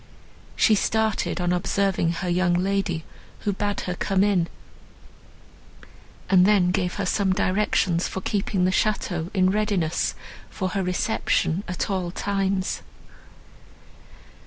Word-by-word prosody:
She 220 - +4
started, 220 0 0
on 175 0 +1
observing 185 -1 +1
her 180 +2 -4
young 175 0 +2
lady, 185 -2 0 0.4
who 205 - 0
bade 205 +1 -2
her 180 - -3
come 190 +2 +1
in, 190 -5 +2 1.8
and 185 -2 +5
then 190 -4 +4
gave 180 -1 -1
her - - -2
some 195 -2 +1
directions 185 -2 +1
for - - -4
keeping 195 -1 0
the 185 - +2
château 185 -4 0
in 185 -1 +3
readiness 200 -6 0 0.3
for 185 -2 -3
her 195 +1 -1
reception 180 -1 0
at 180 - -2
all 185 -2 -1
times. 195 0 -1
190 Hz, 125 wpm, -24 LUFS, 180-200 Hz, 1.8 s, and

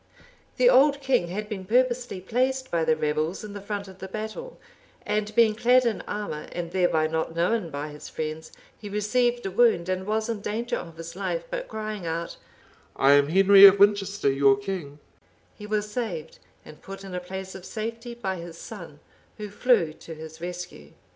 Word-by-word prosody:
The - - +5
old 285 - +5
king 260 -10 +1
had 205 +4 -4
been 205 -3 -5
purposely 245 0 +1
placed 260 +7 -1
by 170 -1 +1
the 160 0 +3
rebels 155 +4 -1
in 210 -1 -8
the 205 - -7
front 200 0 -5
of 190 0 -13
the 190 - -6
battle, 220 - -6 0.5
and 210 0 -1
being 225 -2 +5
clad 245 +3 +4
in 230 -2 0
armor, 205 -8 -4
and 170 -1 -4
thereby 175 -4 +2
not 160 +1 -2
known 175 +2 0
by 145 0 -5
his 150 0 -10
friends, 155 0 -5 0.2
he 205 - -9
received 240 +4 0
a 195 - -2
wound, 195 -5 +3
and 185 +1 -2
was 215 +1 0
in 225 -3 -3
danger 225 +4 -2
of 165 -1 -7
his 165 +1 -8
life; - - -2
but - - -4
crying 215 -4 -5
out, 165 +1 -4 0.6
"I 135 +1 +4
am 145 0 +5
Henry 195 +3 +7
of 195 +1 +6
Winchester, 200 -5 +3
your 135 0 +4
king," 145 -1 -5 0.6
he 210 - -9
was 210 0 -1
saved, 185 -10 -4 0.3
and 150 - -13
put 195 0 -9
in 190 -1 -8
a 180 - -2
place 190 +1 -7
of 190 - -10
safety 230 +4 -5
by 190 -5 -3
his 170 -1 -9
son, 170 -9 -10 0.4
who 210 -2 -7
flew 205 -7 +2
to 160 +1 -10
his 160 +1 -10
rescue. 175 - -7
195 Hz, 190 wpm, -26 LUFS, 165-220 Hz, 0.6 s, Henry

